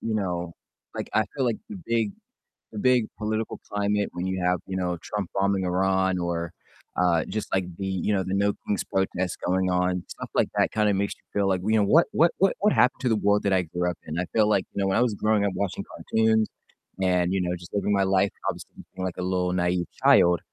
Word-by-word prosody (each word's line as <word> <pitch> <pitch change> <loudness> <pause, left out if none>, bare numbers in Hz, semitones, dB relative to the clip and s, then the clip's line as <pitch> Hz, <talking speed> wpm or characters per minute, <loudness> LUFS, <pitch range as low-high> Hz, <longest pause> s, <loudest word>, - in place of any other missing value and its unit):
you 110 -1 -2
know 90 -4 -2 0.4
like, - - -5
I 110 0 +4
feel 135 - +1
like 120 -2 0
the 215 - -7
big 115 -3 0 0.6
the 105 - -6
big 125 0 +3
political 110 +1 -2
climate 105 0 0
when 90 +1 -4
you 95 -1 -2
have, 90 0 +2
you 95 - -4
know, 90 -2 -1
Trump 105 -4 -4
bombing 95 -1 +1
Iran, 95 +1 +1
or, 85 -1 -2 0.5
uh, 85 -3 +3
just, 110 - -4
like, 95 -1 +2
the 95 - -3
you 95 +2 -1
know, 95 -2 +1
the 95 +1 -3
No 100 +1 +2
Kings 100 -2 -1
protest 95 -2 -1
going 95 0 +1
on, 90 0 0
stuff - - -7
like - - +2
that - - +3
kinda 105 -1 +2
makes 100 +1 -1
you - - -32
feel 100 -1 +1
like, 95 -2 0
you 110 +1 +2
know, - - +3
"What 155 +12 +5
what 165 +2 +4
what 195 +1 +4
what 210 - +4
happened 125 +4 +3
to 130 - 0
the 110 - +2
world 105 0 +2
that 100 - +2
I 95 - +3
grew 90 +1 -2
up 85 - -6
in?" 80 +2 -4
I 90 - -1
feel 110 -2 +4
like, 95 -3 +2
you 100 - -2
know, 95 - +1
when 95 - +2
I 120 - +4
was 115 -4 +1
growing 105 -1 +1
up 100 - -1
watching 100 -2 -2
cartoons, 110 -1 +1 0.5
and, 90 -1 +2
you 95 - +1
know, 90 0 -1
just 85 0 -13
living 105 0 0
my 100 -1 +3
life, 95 +1 +2 0.2
obviously - - -4 0.2
being, 95 - -4
like, 90 - -4
a - - -3
little 90 -1 0
naive 90 0 0 0.2
child, 85 -1 +6
95 Hz, 240 wpm, -26 LUFS, 90-105 Hz, 0.6 s, child